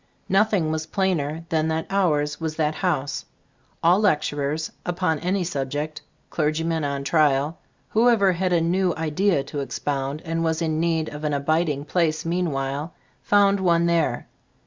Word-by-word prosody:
Nothing 195 -5 +2
was 155 0 -3
plainer 165 -4 -1
than 160 -1 +1
that 160 0 -1
ours 150 -6 +1
was 160 -1 -2
that 155 -1 0
house. 155 -5 -1 0.6
All 175 +4 +5
lecturers, 150 -5 0
upon 175 -3 -1
any 185 +3 0
subject, 150 -1 -3 0.3
clergymen 160 +1 0
on 140 -1 -2
trial, 150 +1 +2 0.3
who 230 +3 +4
ever 200 -5 +4
had 180 +1 -1
a 170 -2 +3
new 180 +2 +1
idea 160 0 +1
to 145 - -6
expound 140 +1 -3
and 165 0 -1
was 160 -1 0
in 160 -2 -1
need 165 -1 0
of 150 +1 -8
an 150 -1 0
abiding 150 0 0
place 160 -1 0
mean 175 +1 0
while, 140 +3 -3 0.3
found 200 -1 +3
one 170 -2 +3
there. 170 -1 +1
160 Hz, 155 wpm, -24 LUFS, 150-175 Hz, 0.6 s, All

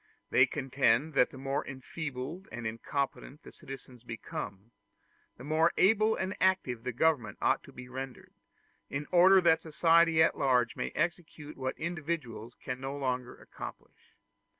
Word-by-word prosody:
They 130 +1 +6
contend 135 +1 +1
that 125 - +4
the - - -12
more 135 +1 -2
enfeebled 140 +5 -6
and 120 0 -6
incompetent 135 +5 -3
the - - -11
citizens 130 -2 -11
become, 115 -2 -7 0.7
the 125 - -11
more 160 +4 +2
able 215 +2 +4
and 190 +1 -3
active 185 -11 +2
the 125 - -2
government 125 -5 +1
ought - - +2
to - - -13
be 125 0 -10
rendered, 130 0 -7 0.6
in 145 +2 -3
order 185 +2 +7
that 165 -2 +4
society 165 0 +4
at - - +2
large 125 -4 +2
may - - -3
execute 155 -2 -3
what 130 -1 -3
individuals 155 -9 -4
can 125 -1 -6
no 135 +1 -4
longer 125 -2 -2
accomplish. - - -11
140 Hz, 150 wpm, -31 LUFS, 125-165 Hz, 0.7 s, order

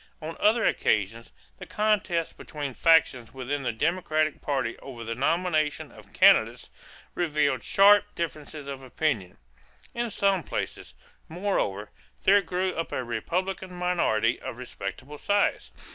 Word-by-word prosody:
On 160 +1 -6
other 220 +2 +3
occasions, 110 +3 0 0.3
the - - -9
contests 205 -6 0
between 145 -3 -6
factions 135 -6 +3
within 135 +2 -3
the 125 - -1
Democratic 155 +3 0
party 135 -5 -1
over 120 -4 -9
the 115 +1 -3
nomination 155 +3 0
of - - -16
candidates - - +4 0.4
revealed 150 -4 0
sharp 205 +1 +6
differences 150 -3 -5
of 135 -1 -6
opinion. 130 - -2 0.6
In 235 0 -2
some 195 -3 +1
places, - - -5 0.3
moreover, 160 - -2 0.3
there 200 +1 +6
grew 185 +1 -2
up 165 - -4
a 130 - -2
Republican 180 +10 -3
minority 150 -11 +1
of - - -6
respectable 125 +4 -7
size. 205 0 +1
155 Hz, 130 wpm, -27 LUFS, 125-180 Hz, 0.6 s, sharp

